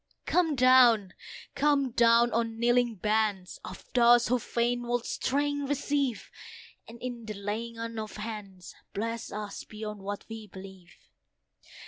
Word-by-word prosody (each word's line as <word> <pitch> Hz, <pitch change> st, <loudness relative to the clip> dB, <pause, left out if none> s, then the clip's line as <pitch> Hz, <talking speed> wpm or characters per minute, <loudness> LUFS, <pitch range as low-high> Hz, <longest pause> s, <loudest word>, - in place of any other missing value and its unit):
Come 335 Hz, -4 st, +2 dB
down! 245 Hz, -6 st, +5 dB, 0.4 s
come 280 Hz, -3 st, +2 dB
down! 235 Hz, +1 st, +4 dB
on 230 Hz, -1 st, -1 dB
kneeling 240 Hz, 0 st, +2 dB
bands 210 Hz, -2 st, -1 dB
Of 185 Hz, -, -9 dB
those 240 Hz, -1 st, +5 dB
who 250 Hz, 0 st, +2 dB
fain 240 Hz, +1 st, -1 dB
would 245 Hz, 0 st, -1 dB
strength 285 Hz, +1 st, -1 dB
receive; 280 Hz, -3 st, -1 dB, 0.6 s
And 235 Hz, +1 st, -11 dB
in 240 Hz, -2 st, -5 dB
the 215 Hz, -, -5 dB
laying 215 Hz, +4 st, -4 dB
on 230 Hz, 0 st, -5 dB
of 215 Hz, -1 st, -6 dB
hands 210 Hz, -4 st, -7 dB, 0.2 s
Bless 230 Hz, +2 st, -3 dB
us 210 Hz, -1 st, -6 dB
beyond 210 Hz, -1 st, -7 dB
what 200 Hz, +1 st, -5 dB
we 225 Hz, -1 st, -8 dB
believe. 190 Hz, -2 st, -12 dB
230 Hz, 135 wpm, -29 LUFS, 210-245 Hz, 0.6 s, down